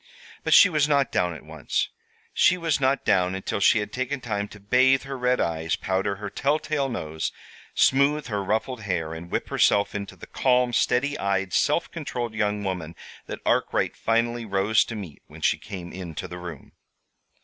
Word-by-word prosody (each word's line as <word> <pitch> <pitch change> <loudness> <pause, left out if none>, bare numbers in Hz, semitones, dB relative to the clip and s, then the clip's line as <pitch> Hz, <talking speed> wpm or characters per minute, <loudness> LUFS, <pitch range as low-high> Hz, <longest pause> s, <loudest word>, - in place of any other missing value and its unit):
But - - +4
she - - +9
was 150 -4 +2
not 140 -2 +2
down 90 -2 0
at 75 - -12
once. 80 -2 -2 0.4
She 180 - +4
was 165 -3 0
not 135 0 +1
down 90 -1 +2
until 95 +1 -3
she 100 - +5
had 105 -1 -3
taken 130 +2 -2
time 105 -5 -3
to 105 - -13
bathe 130 +6 +3
her 135 0 -5
red 125 0 +1
eyes, 80 -1 0
powder 95 +1 -1
her 105 +1 -6
telltale 145 0 0
nose, 80 -9 -3 0.4
smoothe 140 +2 +3
her 105 -4 -2
ruffled 110 +5 -1
hair, 85 -5 -2
and 85 +1 -8
whip - - -2
herself 100 0 +3
into 100 -1 -5
the - - -11
calm, 125 -1 +2
steady 140 +5 +1
eyed, 95 -1 -1
self - - +1
controlled 120 -2 -4
young 105 -1 -1
woman 90 -4 -4 0.3
that - - -6
Arkwright - - +1
finally 115 +1 0
rose 100 +1 +2
to 115 - -6
meet 95 -9 -8
when - - -13
she - - +2
came 90 -5 -8
into 90 -1 -6
the 90 0 -8
room. 85 -5 -9
105 Hz, 180 wpm, -25 LUFS, 95-130 Hz, 0.4 s, she